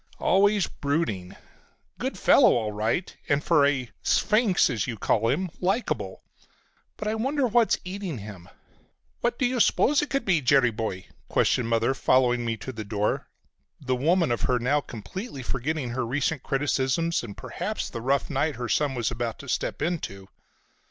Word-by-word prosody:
Always 200 +1 +3
brooding. 140 - -2 0.6
Good - - -3
fellow - - +6
all 110 -3 -1
right, 110 - -1
and, 145 +1 +2
for 150 -4 +4
a 130 -4 -1
'sphinx' 215 -3 +3
as 115 -6 -2
you 115 -3 -4
call 110 +3 +1
him, 175 +6 -1
likable. 195 +7 -1 0.7
But 210 - -4
I 215 - 0
wonder 265 +5 0
what 235 -1 +3
is - - -14
eating 185 -5 -4
him?" 100 -4 -10 0.7
"What 240 0 0
do 255 - +1
you 245 0 0
suppose 280 +5 +4
it 295 - -3
could 275 -3 -1
be, 175 -6 +3
Jerry 130 -2 +4
boy?" 105 -4 -4 0.2
questioned 120 -3 +2
Mother 115 +3 +2
following 125 -2 +2
me 115 -1 -2
to 130 - -6
the 110 -3 -6
door, 105 0 -1 0.5
the 130 -2 -1
woman 165 +3 +2
of 120 - -1
her 125 - +2
now 135 +5 +1
completely 135 - -7
forgetting 135 +2 -2
her 130 +2 -2
recent 135 +4 -1
criticisms 140 +4 0
and, 105 -4 -8
perhaps, - - -4
the 115 - -6
rough 135 +3 +1
night 145 +1 0
her 120 0 -4
son 145 -3 +1
was 120 -2 -1
about 115 -1 -3
to 140 - -11
step 130 - -2
into. 100 - -3
135 Hz, 170 wpm, -26 LUFS, 115-175 Hz, 0.7 s, fellow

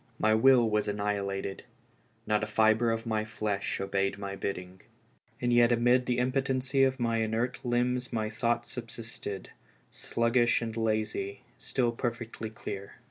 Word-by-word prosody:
My 110 0 +3
will 120 +1 +6
was 105 -1 +1
annihilated, 100 -1 -2 0.6
not 105 0 +1
a - - -1
fibre 110 +2 +3
of 115 0 -1
my 110 -2 0
flesh 105 -3 -2
obeyed 100 0 0
my 100 -1 -5
bidding. 95 -1 -5 0.6
And 120 -1 +1
yet 120 0 +5
amid 120 +1 +3
the 125 -1 +1
impo 130 +2 +2
tency 135 0 +2
of 130 0 -3
m\^ 115 -1 +1
inert 115 +4 -2
limbs 125 0 0
my 110 -2 -1
thoughts 120 +1 -1
subsisted, 115 -4 -6 0.4
sluggish 120 +1 +2
and 115 -2 -4
lazy, 110 -3 -1 0.2
still 120 -2 0
perfectly 115 -1 -4
clear. 100 -3 -7
115 Hz, 145 wpm, -29 LUFS, 105-120 Hz, 0.6 s, will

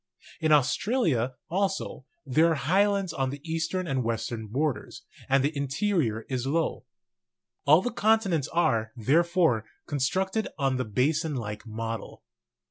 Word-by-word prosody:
In 155 -1 +1
Australia, 145 - +2
also, 190 -6 -2 0.2
there 155 +5 +4
are 165 - +2
highlands 195 +4 +1
on 135 -3 -1
the 140 +2 -6
eastern 165 +3 -1
and 135 -5 -1
western 115 -1 -3
borders, 130 0 -2 0.3
and 135 0 +4
the 150 +2 0
interior 140 - 0
is 130 -1 -2
low. 160 +4 -1 0.8
All 155 +6 +7
the 245 - -1
continents 210 - +2
are, 115 -10 +1
therefore, 160 - +2 0.2
con 145 - -3
structed 190 - 0
on 135 -3 +1
the 130 - -1
basin 150 - 0
like 105 -2 -5
model. 115 0 -5
145 Hz, 135 wpm, -27 LUFS, 125-175 Hz, 0.8 s, All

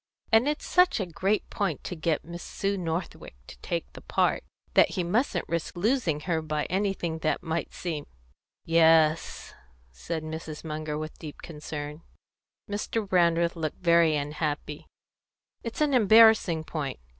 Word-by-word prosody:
And 225 +4 +5
it's 300 +1 -1
such 360 -7 +3
a 195 - -1
great 190 +4 -1
point 195 -8 -2
to 180 - -5
get 160 -1 -1
Miss 170 +1 -8
Sue 200 0 -2
Northwick 170 - -4
to - - -11
take - - -3
the - - -11
part, - - +1 0.3
that - - +5
he 180 - +1
mustn't 190 +1 0
risk 170 +1 -3
losing 190 - +1
her 165 0 -1
by 155 -1 -2
anything 190 -4 -1
that 155 -1 -1
might 160 +1 -2
seem 160 -5 -5 0.3
" - - -65
"Yes," 160 -1 +3 0.4
said 155 - -5
Mrs. 155 -1 -6
Munger, 155 -1 -4
with 155 0 -6
deep 155 -3 -9
concern. 150 -1 -7 0.7
Mr. 210 +1 -2
Brandreth 170 -2 +2
looked 160 +1 -4
very 170 -2 +5
unhappy. 150 0 -3 0.7
"It's 230 +5 -6
an 295 -2 +2
embarrassing 220 -7 +6
point. 150 -4 -4
165 Hz, 150 wpm, -27 LUFS, 155-195 Hz, 0.7 s, embarrassing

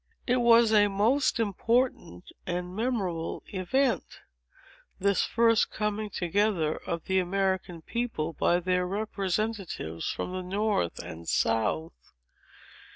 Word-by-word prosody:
"It 250 0 +2
was 235 -2 +5
a 205 -1 +6
most 225 +7 +2
important 225 - 0 0.2
and 180 +1 -3
memorable 195 -8 -2
event—this 200 - -2
first 230 -1 +3
coming 210 0 -2
together 180 -3 0
of 170 -1 -5
the 190 0 +1
American 185 -2 -1
people, 225 -10 -3
by 175 +3 +2
their 180 0 +1
representatives 195 - -2
from - - -4
the 185 0 -3
north 195 - -1
and 85 +1 -7
south. 115 - -1
195 Hz, 105 wpm, -28 LUFS, 175-220 Hz, 0.2 s, a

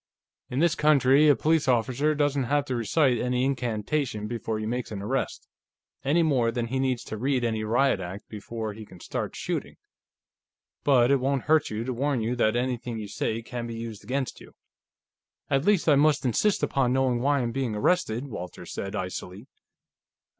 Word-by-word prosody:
"In 125 - -4
this 170 -1 +4
country, 150 -1 +4
a 145 - +6
police 155 0 +1
officer 130 +5 +2
doesn't 145 -2 +1
have 145 +2 +1
to 130 - -2
recite 120 +2 +2
any 125 +1 0
incantation 120 -2 -1
before 115 -1 -3
he 110 - -4
makes 120 +2 -3
an 105 - -4
arrest, 125 +7 -3 0.6
any 155 +5 +3
more 130 -7 +2
than 120 0 -2
he 130 +2 -1
needs 130 -2 0
to 110 - -6
read 130 +2 0
any 110 -2 -1
Riot 120 +1 +2
Act 95 +2 -7
before 110 +1 -5
he 110 +1 -9
can 95 -4 -14
start - - -4
shooting, - - -4 1.1
but 130 -3 +4
it 140 - +4
won't 135 +1 0
hurt 155 -1 +3
to 110 +3 -4
warn 135 +1 0
you 115 +2 -1
that 110 -2 +2
anything 120 -1 -2
you 105 -2 -5
say 110 +2 -2
can 120 0 -5
be 115 - -6
used 115 -3 -7
against 130 +4 -3
you." - - -15 1.0
"At 135 +2 +2
least, 205 -5 +3
I 155 - +6
must 145 -1 +3
insist 190 - +1
upon 130 -2 +1
knowing 130 -2 +2
why 140 +2 +2
I - - +1
am 120 - -1
being 130 -4 -2
arrested," 125 -1 +1
Walters 90 -8 -8
said 100 +1 -4
icily. 95 +2 -5
125 Hz, 185 wpm, -26 LUFS, 110-140 Hz, 1.1 s, a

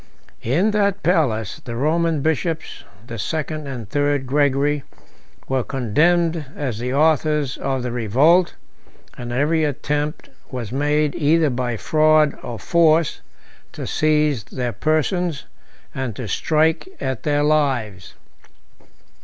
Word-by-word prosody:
In 170 - +1
that 200 -1 0
palace, 125 - 0
the 120 - -6
Roman 160 +3 +1
bishops, 160 +2 -2 0.2
the 115 -2 -7
second 155 +4 -3
and 125 -6 -6
third 145 +3 0
Gregory, 145 +1 +1 0.7
were 130 -1 0
condemned 160 +7 +1
as 125 -7 -3
the 125 +1 -3
authors 150 -1 +2
of 135 -2 -2
the 125 - -3
revolt, 135 - +3 0.6
and 120 -1 -7
every 150 +6 +1
attempt 150 +1 -2 0.2
was 120 -4 -5
made, 150 +2 +1
either 155 -1 +2
by 120 -2 -2
fraud 155 +2 +3
or 120 - -6
force, 165 - +2 0.5
to - - -6
seize 150 -5 +1
their 125 +1 -4
persons, 155 0 0 0.5
and 130 -5 -4
to 120 - -6
strike 160 - +1
at 130 -3 -3
their 145 -1 +1
lives. 130 -11 0
145 Hz, 120 wpm, -21 LUFS, 125-155 Hz, 0.7 s, revolt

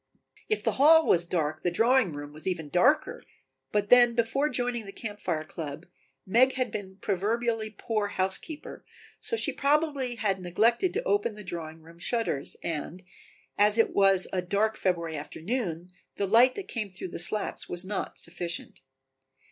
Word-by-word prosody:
If 430 - 0
the - - +2
hall 320 +3 +6
was 170 0 +3
dark 155 -3 -2
the 175 - +1
drawing 230 +2 +3
room 145 0 -8
was 155 +4 -8
even 165 -5 -2
darker, 285 - +2 0.5
but 205 0 0
then 240 -1 +7
before 245 +6 +1
joining 245 -5 -2
the - - -7
Camp 210 0 -7
Fire 160 -4 -2
club 155 0 -7 0.4
Meg 250 +7 +4
had 255 -4 -2
been 190 -2 -6
a 190 - -19
proverbially 220 +2 -1
poor 215 -3 -1
housekeeper, 195 - 0 0.4
so 460 - -1
she - - +2
probably 285 -3 +1
had 195 -4 -1
neglected 230 - +2
to 455 - -1
open 410 - 0
the 210 - -9
drawing 160 -3 -7
room 165 +1 -16
shutters 225 - -1
and, 170 +3 -4 0.6
as 210 +1 +5
it 225 - +3
was 195 -2 +4
a 185 - +1
dark 205 +4 0
February 170 -5 -1
afternoon, 175 - -4 0.2
the 200 - -1
light 235 +6 +5
that 400 - -6
came 215 -4 -4
through 185 0 -8
the - - -6
slats 190 +5 -2
was 175 +1 -2
not 200 +1 -4
sufficient. 170 0 -6
205 Hz, 170 wpm, -28 LUFS, 175-240 Hz, 0.6 s, then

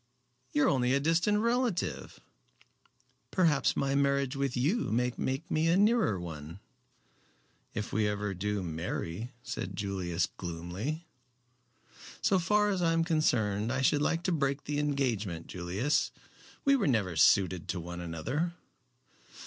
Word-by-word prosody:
"You 145 - +2
are - - +4
only 130 -1 +2
a - - +3
distant 165 +8 +2
relative." 235 -4 -1 1.1
"Perhaps 165 -7 +2
my 135 0 +1
marriage 140 -1 +1
with 135 -2 -1
you 170 - +1
may 125 +2 +1
make 135 +5 -3
me 155 +1 +2
a 170 +2 +4
nearer 205 - +3
one." 80 0 -7 1.2
"If 105 0 -4
we 110 -1 +2
ever 105 -1 -2
do 100 +1 -2
marry," 85 +6 -4
said - - -5
Julius, 95 -4 -1
gloomily. 90 - -5 1.1
"So 200 -3 +3
far 210 +4 +2
as 190 -3 0
I 165 -1 +3
am 165 0 +2
concerned 115 - +1
I 130 0 0
should 145 +2 +3
like 165 +3 0
to 185 - 0
break 140 -3 0
the 145 0 -2
engagement, 120 - -1
Julius. 95 - 0 0.6
We 275 0 +6
were 225 -8 +1
never 105 -9 +1
suited 90 +2 +4
to 90 - -2
one 85 +1 -6
another." 125 - -2
130 Hz, 140 wpm, -30 LUFS, -, 1.2 s, We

